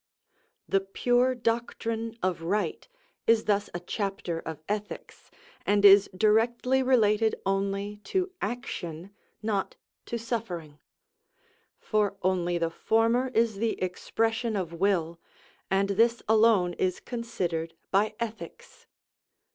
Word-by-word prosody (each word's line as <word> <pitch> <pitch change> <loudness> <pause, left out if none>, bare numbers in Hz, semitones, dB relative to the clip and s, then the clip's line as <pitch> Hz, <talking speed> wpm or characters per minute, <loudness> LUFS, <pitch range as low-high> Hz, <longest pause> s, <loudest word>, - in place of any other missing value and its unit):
The 195 - +3
pure 245 +6 +1
doctrine 230 -1 -2
of 185 -3 0
right 195 +6 -2 0.4
is 225 -1 +4
thus 205 -1 +1
a 175 - -4
chapter 185 -2 -3
of 160 -1 -7
ethics, 210 0 -5 0.3
and 205 0 +3
is 200 0 +8
directly 235 +5 +3
related 225 -4 +3
only 195 +1 -1
to 375 - -1
action, 180 -8 -5 0.3
not 205 -3 -1 0.3
to 235 - -2
suffering; 180 -10 -5 1.0
for 210 -2 0
only 175 -1 +1
the 165 -1 -1
former 230 +7 +2
is 225 -2 +2
the 225 +2 -1
expression 225 +5 -1
of 180 -4 -3
will, 170 -2 0 0.5
and 195 +1 +2
this 230 +4 +2
alone 215 -5 +4
is 185 -1 0
considered 175 -9 -3 0.2
by 210 +3 +2
ethics. 225 -1 -7
205 Hz, 115 wpm, -28 LUFS, 185-230 Hz, 1.0 s, is